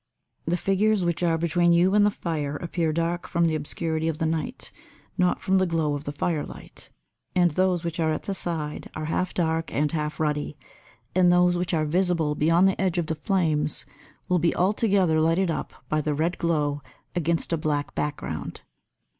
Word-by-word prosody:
The 170 Hz, +2 st, +1 dB
figures 195 Hz, +1 st, +2 dB
which 170 Hz, 0 st, -1 dB
are 165 Hz, -2 st, +2 dB
between 170 Hz, +1 st, +2 dB
you 180 Hz, +3 st, +4 dB
and 210 Hz, 0 st, +5 dB
the 205 Hz, -, +5 dB
fire 155 Hz, -7 st, -3 dB
appear 165 Hz, 0 st, -1 dB
dark 170 Hz, +2 st, -1 dB
from 170 Hz, 0 st, +1 dB
the 160 Hz, -, +1 dB
obscurity 160 Hz, +1 st, -2 dB
of 160 Hz, -2 st, -1 dB
the 160 Hz, -, -1 dB
night, 160 Hz, 0 st, -2 dB, 0.4 s
not 180 Hz, -1 st, +2 dB
from 190 Hz, 0 st, +2 dB
the 185 Hz, -, +2 dB
glow 160 Hz, -3 st, 0 dB
of 145 Hz, 0 st, -4 dB
the 145 Hz, -, -3 dB
firelight, 150 Hz, +1 st, -4 dB, 0.5 s
and 175 Hz, -2 st, +4 dB
those 185 Hz, +1 st, +1 dB
which 170 Hz, 0 st, -4 dB
are 160 Hz, -1 st, +2 dB
at 155 Hz, -, -3 dB
the 200 Hz, -, -3 dB
side 160 Hz, -5 st, -4 dB
are 155 Hz, -, -3 dB
half 180 Hz, +3 st, -1 dB
dark 165 Hz, -1 st, 0 dB
and 150 Hz, +1 st, 0 dB
half 150 Hz, -2 st, -3 dB
ruddy, 150 Hz, -1 st, -1 dB, 0.6 s
and 180 Hz, -1 st, +5 dB
those 180 Hz, 0 st, +4 dB
which 175 Hz, 0 st, -1 dB
are 155 Hz, -1 st, +1 dB
visible 170 Hz, -2 st, +1 dB
beyond 165 Hz, +5 st, +4 dB
the 190 Hz, -, 0 dB
edge 185 Hz, -2 st, +1 dB
of 175 Hz, -, +1 dB
the 160 Hz, -, -2 dB
flames 155 Hz, -4 st, 0 dB, 0.4 s
will 180 Hz, -1 st, +2 dB
be 170 Hz, +1 st, +1 dB
altogether 190 Hz, -4 st, +2 dB
lighted 165 Hz, +3 st, +2 dB
up -, -, -4 dB, 0.2 s
by 155 Hz, 0 st, 0 dB
the 150 Hz, 0 st, -1 dB
red 165 Hz, +4 st, -1 dB
glow 150 Hz, -4 st, 0 dB, 0.3 s
against 170 Hz, 0 st, 0 dB
a -, -, +4 dB
black 150 Hz, -2 st, -1 dB
background. 145 Hz, -, -4 dB
165 Hz, 190 wpm, -25 LUFS, 155-180 Hz, 0.6 s, and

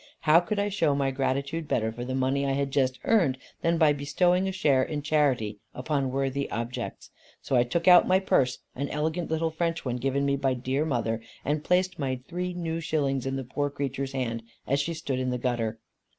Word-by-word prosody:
How 155 Hz, +2 st, +6 dB
could 180 Hz, +4 st, -3 dB
I 200 Hz, +1 st, +1 dB
show 165 Hz, -8 st, +1 dB
my 135 Hz, -1 st, +1 dB
gratitude 140 Hz, +4 st, -1 dB
better 110 Hz, -2 st, 0 dB
for 120 Hz, +2 st, -6 dB
the 130 Hz, +1 st, -3 dB
money 135 Hz, +1 st, +1 dB
I 135 Hz, -1 st, +1 dB
had 140 Hz, 0 st, -1 dB
just 130 Hz, -2 st, +1 dB
earned, 175 Hz, -, +3 dB, 0.2 s
than 165 Hz, 0 st, +2 dB
by 155 Hz, -3 st, +5 dB
bestowing 180 Hz, +6 st, +1 dB
a -, -, -1 dB
share 145 Hz, -8 st, +3 dB
in 145 Hz, +2 st, -2 dB
charity 135 Hz, -9 st, +1 dB, 0.2 s
upon 135 Hz, +1 st, -1 dB
worthy 135 Hz, +1 st, -1 dB
objects? 115 Hz, +2 st, -5 dB, 0.3 s
So -, -, 0 dB
I 120 Hz, -, +5 dB
took 165 Hz, +8 st, -2 dB
out 180 Hz, -1 st, +8 dB
my 185 Hz, -, +5 dB
purse, 130 Hz, -9 st, +2 dB, 0.2 s
an 140 Hz, +2 st, -3 dB
elegant 160 Hz, +3 st, -2 dB
little 160 Hz, 0 st, 0 dB
French 165 Hz, 0 st, -2 dB
one 125 Hz, -1 st, -1 dB
given 135 Hz, +2 st, 0 dB
me 140 Hz, 0 st, +1 dB
by 135 Hz, -1 st, +1 dB
dear 130 Hz, +4 st, -1 dB
mother, 115 Hz, -6 st, -1 dB, 0.2 s
and 150 Hz, +2 st, 0 dB
placed 180 Hz, 0 st, +1 dB
my 130 Hz, -3 st, -1 dB
three 180 Hz, +1 st, -3 dB
new 165 Hz, -2 st, -2 dB
shillings 140 Hz, -5 st, -1 dB
in 135 Hz, -, -1 dB
the 135 Hz, -, -3 dB
poor 145 Hz, +3 st, -2 dB
creature's 140 Hz, -1 st, -3 dB
hand, 115 Hz, -3 st, -2 dB, 0.2 s
as 140 Hz, +2 st, +1 dB
she 165 Hz, +4 st, -1 dB
stood 140 Hz, -5 st, -3 dB
in 130 Hz, 0 st, -1 dB
the 125 Hz, -, -1 dB
gutter. 120 Hz, -3 st, -1 dB
140 Hz, 210 wpm, -27 LUFS, 130-160 Hz, 0.3 s, out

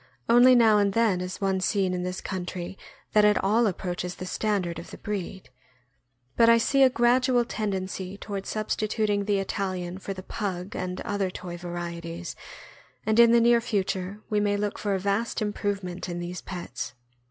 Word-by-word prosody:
Only 245 Hz, +2 st, +7 dB
now 220 Hz, -3 st, +6 dB
and 200 Hz, -1 st, +2 dB
then 215 Hz, -5 st, +2 dB
is 180 Hz, 0 st, -5 dB
one 195 Hz, -1 st, +1 dB
seen 190 Hz, -2 st, +1 dB
in 180 Hz, -, -2 dB
this 180 Hz, +1 st, -4 dB
country 180 Hz, -1 st, -5 dB, 0.4 s
that 210 Hz, -, +5 dB
at 210 Hz, -1 st, +5 dB
all 220 Hz, +4 st, +3 dB
approaches 180 Hz, -1 st, -3 dB
the 185 Hz, -, -7 dB
standard 185 Hz, -3 st, -1 dB
of -, -, -10 dB
the -, -, -9 dB
breed; 190 Hz, -, -5 dB, 0.8 s
but 230 Hz, 0 st, +6 dB
I 230 Hz, -, +7 dB
see 275 Hz, +4 st, +2 dB
a 265 Hz, -, +8 dB
gradual 245 Hz, 0 st, +3 dB
tendency 190 Hz, -3 st, -3 dB
toward 200 Hz, -2 st, -5 dB
substituting 215 Hz, -1 st, -1 dB
the 205 Hz, -1 st, +2 dB
Italian 185 Hz, -2 st, -3 dB
for 195 Hz, 0 st, -5 dB
the 185 Hz, -, -8 dB
Pug 190 Hz, -2 st, -4 dB
and 180 Hz, 0 st, -3 dB
other 200 Hz, -2 st, -1 dB
toy 180 Hz, -1 st, -7 dB
varieties, 170 Hz, -1 st, -6 dB, 0.7 s
and 220 Hz, +1 st, +2 dB
in 235 Hz, -1 st, +8 dB
the 235 Hz, -, +6 dB
near 235 Hz, 0 st, +5 dB
future 200 Hz, -3 st, -2 dB
we 210 Hz, -, +1 dB
may 205 Hz, 0 st, +1 dB
look 205 Hz, 0 st, -2 dB
for 205 Hz, -2 st, 0 dB
a -, -, -1 dB
vast 200 Hz, +4 st, -1 dB
improvement 200 Hz, -4 st, -3 dB
in 175 Hz, -, -4 dB
these 175 Hz, +1 st, -5 dB
pets. 175 Hz, -7 st, -6 dB
200 Hz, 175 wpm, -26 LUFS, 180-215 Hz, 0.8 s, a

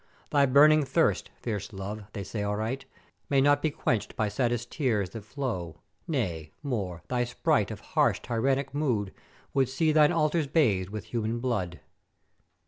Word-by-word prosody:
Thy 140 Hz, -1 st, +4 dB
burning 150 Hz, +3 st, +6 dB
thirst, 135 Hz, -, +1 dB
fierce 105 Hz, -3 st, -4 dB
Love, 100 Hz, +1 st, -6 dB
they 100 Hz, -, -4 dB
say 105 Hz, +3 st, -4 dB
aright, 110 Hz, +6 st, -2 dB, 0.4 s
may 140 Hz, -, +3 dB
not 145 Hz, +1 st, +4 dB
be 155 Hz, -, +2 dB
quencht 120 Hz, -6 st, -1 dB
by 110 Hz, -1 st, 0 dB
saddest 120 Hz, 0 st, -1 dB
tears 110 Hz, -, 0 dB
that 115 Hz, -1 st, -7 dB
flow; 110 Hz, -, -4 dB, 0.3 s
Nay, 90 Hz, -, -2 dB
more, 100 Hz, -, -3 dB
thy 125 Hz, -1 st, 0 dB
sprite 120 Hz, -, +1 dB
of -, -, -7 dB
harsh -, -, +3 dB
tyrannick 135 Hz, +3 st, 0 dB
mood 120 Hz, -10 st, 0 dB, 0.4 s
would 135 Hz, -2 st, +2 dB
see 155 Hz, +4 st, +2 dB
thine 150 Hz, -1 st, +5 dB
altars 155 Hz, -1 st, +1 dB
bathed 110 Hz, -, +2 dB
with 105 Hz, 0 st, -5 dB
human 115 Hz, 0 st, -1 dB
blood. 100 Hz, -9 st, -2 dB
120 Hz, 155 wpm, -28 LUFS, 105-140 Hz, 0.4 s, burning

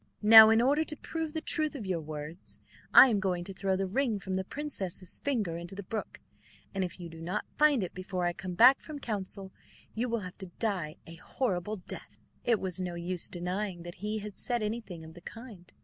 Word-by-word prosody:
Now, 220 Hz, +1 st, +11 dB
in 225 Hz, +1 st, +5 dB
order 290 Hz, +5 st, +3 dB
to 305 Hz, -1 st, -5 dB
prove 320 Hz, 0 st, -4 dB
the 315 Hz, -, -2 dB
truth 310 Hz, -2 st, 0 dB
of 235 Hz, -7 st, -5 dB
your 180 Hz, -3 st, -1 dB
words, 155 Hz, +3 st, -8 dB, 0.3 s
I 265 Hz, -, +10 dB
am 215 Hz, -4 st, +2 dB
going 180 Hz, -3 st, -1 dB
to 195 Hz, +2 st, -6 dB
throw 190 Hz, 0 st, 0 dB
the 195 Hz, +1 st, 0 dB
ring 225 Hz, +3 st, 0 dB
from 190 Hz, -1 st, -5 dB
the 190 Hz, 0 st, 0 dB
princess's 190 Hz, -, -4 dB
finger 215 Hz, -12 st, -1 dB
into 170 Hz, +2 st, -6 dB
the 200 Hz, -, -6 dB
brook, 215 Hz, +3 st, -5 dB, 0.5 s
and 195 Hz, -1 st, 0 dB
if 180 Hz, 0 st, -5 dB
you 175 Hz, -, -6 dB
do 165 Hz, 0 st, -11 dB
not 180 Hz, +5 st, -2 dB
find 295 Hz, -7 st, +4 dB
it 180 Hz, -, -5 dB
before 185 Hz, -1 st, -3 dB
I 175 Hz, -, +1 dB
come 185 Hz, -1 st, -6 dB
back 255 Hz, +7 st, +7 dB
from 305 Hz, -2 st, -8 dB
council, 200 Hz, -6 st, -4 dB, 0.4 s
you 240 Hz, +3 st, -1 dB
will 230 Hz, -1 st, -1 dB
have 180 Hz, 0 st, -9 dB
to 190 Hz, -, -6 dB
die 185 Hz, -9 st, -1 dB
a 165 Hz, 0 st, -9 dB
horrible 210 Hz, -1 st, -2 dB
death." 185 Hz, -, -8 dB, 0.3 s
It 230 Hz, -3 st, +3 dB
was 185 Hz, -1 st, -3 dB
no 180 Hz, -1 st, -3 dB
use 175 Hz, +1 st, -3 dB
denying 180 Hz, 0 st, -3 dB
that 175 Hz, 0 st, -7 dB
he 210 Hz, +1 st, -2 dB
had 210 Hz, -1 st, -7 dB
said 240 Hz, -3 st, -1 dB
anything 210 Hz, -6 st, -4 dB
of 160 Hz, 0 st, -11 dB
the 175 Hz, -, -13 dB
kind. 215 Hz, -3 st, -11 dB
195 Hz, 220 wpm, -30 LUFS, 180-230 Hz, 0.5 s, Now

